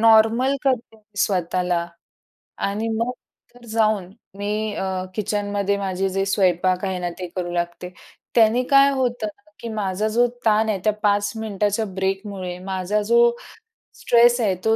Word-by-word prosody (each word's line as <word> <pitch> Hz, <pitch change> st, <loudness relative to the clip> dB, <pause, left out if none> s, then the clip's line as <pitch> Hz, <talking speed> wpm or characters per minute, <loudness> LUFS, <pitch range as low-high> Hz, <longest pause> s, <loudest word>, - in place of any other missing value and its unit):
Normal 225 Hz, +4 st, +5 dB
करते 245 Hz, -4 st, 0 dB
मी 210 Hz, -1 st, -29 dB
स्वतःला. 180 Hz, -2 st, 0 dB, 0.7 s
आणि 210 Hz, +3 st, -2 dB
मग 230 Hz, +2 st, 0 dB, 0.4 s
तर 245 Hz, -1 st, -16 dB
जाऊन 215 Hz, -4 st, +1 dB, 0.3 s
मी 210 Hz, +1 st, -2 dB
अ, 190 Hz, -1 st, -2 dB
किचनमध्ये 205 Hz, -1 st, -1 dB
माझे 195 Hz, -1 st, -1 dB
जे 195 Hz, +1 st, -1 dB
स्वयंपाक 185 Hz, -1 st, +1 dB
आहे 185 Hz, -1 st, -2 dB
ना 175 Hz, 0 st, -2 dB
ते 180 Hz, -, -4 dB
करू 175 Hz, -1 st, -3 dB
लागते. 175 Hz, +1 st, -3 dB, 0.4 s
त्याने 230 Hz, +2 st, +4 dB
काय 275 Hz, 0 st, +7 dB
होतं 250 Hz, -4 st, -1 dB
ना 270 Hz, +8 st, -13 dB
की 235 Hz, -, -6 dB
माझा 205 Hz, 0 st, -1 dB
जो 240 Hz, +1 st, +4 dB, 0.2 s
ताण 220 Hz, 0 st, +3 dB
आहे 200 Hz, -3 st, 0 dB
त्या 215 Hz, -1 st, +3 dB
5 205 Hz, 0 st, +2 dB
मिनिटाच्या 210 Hz, 0 st, -1 dB
ब्रेकमुळे 190 Hz, -1 st, -3 dB
माझा 190 Hz, +2 st, -1 dB
जो 235 Hz, +3 st, +3 dB, 0.8 s
स्ट्रेस 240 Hz, +1 st, +5 dB
आहे, 195 Hz, -4 st, +2 dB
तो 220 Hz, -, +4 dB
205 Hz, 150 wpm, -22 LUFS, 190-225 Hz, 0.8 s, काय